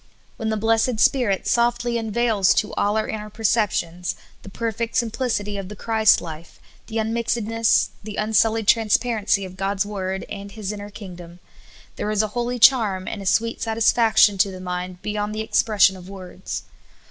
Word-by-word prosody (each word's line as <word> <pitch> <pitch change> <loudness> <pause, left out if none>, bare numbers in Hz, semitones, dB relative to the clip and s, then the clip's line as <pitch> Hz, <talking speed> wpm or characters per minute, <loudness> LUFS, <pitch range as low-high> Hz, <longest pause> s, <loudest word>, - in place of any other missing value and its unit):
When 220 -2 -2
the 220 - -1
blessed 225 +2 +1
Spirit 225 -8 +2
softly 240 0 +1
unveils 220 -3 +2
to 215 - 0
all 205 +1 0
our 220 - -1
inner 210 -1 -5
perceptions 200 -5 -1 0.3
the - - -11
perfect 230 +2 -3
simplicity 225 -4 -1
of 195 -1 -6
the 210 - -8
Christ 220 +1 +3
life, 165 0 -9 0.3
the 220 - -5
unmixed 230 +1 -1
ness, 225 +1 +2
the 210 0 -7
unsullied 220 0 +1
transparency 220 -2 +2
of 185 0 -10
God's 195 +1 -1
Word 190 -2 -4
and 200 0 -8
His 215 -3 -4
inner 205 -1 -7
kingdom, 180 -4 -11 0.6
there 210 - -2
is 215 0 +2
a 215 - -2
hol}^ 240 +2 -3
charm 220 -7 +4
and 210 - -5
a 195 - -5
sweet 230 +5 +1
satisfaction 220 -2 +3
to 200 +1 +4
the 185 -1 -8
mind 180 0 -5
be3'ond 210 0 -2
the 215 - -3
expression 210 -3 +3
of 185 0 -12
words. 185 -1 -7
210 Hz, 170 wpm, -22 LUFS, 195-225 Hz, 0.6 s, charm